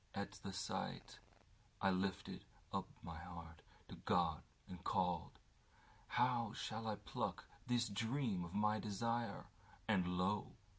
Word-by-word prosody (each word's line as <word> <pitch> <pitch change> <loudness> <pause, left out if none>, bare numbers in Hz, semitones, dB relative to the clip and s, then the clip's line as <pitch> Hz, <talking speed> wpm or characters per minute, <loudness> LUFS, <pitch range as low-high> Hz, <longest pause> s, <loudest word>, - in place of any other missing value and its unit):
At 100 0 -1
the 100 - -3
sightI 95 0 -2 0.7
lifted 95 +1 0 0.3
up - - +1 0.2
my 85 -1 -5
heart 85 -2 -8 0.3
to - - -8
God - - +3 0.3
and 90 0 -7
called:How 110 +6 0
shall 110 0 -2
I 110 - +2
pluck - - -2 0.2
this 120 -1 +4
dream 110 -2 +1
of 85 +3 -6
my 105 +1 +4
desire? 115 +3 0 0.4
And 90 -4 +3
lo! 95 +3 +2
100 Hz, 115 wpm, -42 LUFS, 90-115 Hz, 0.7 s, this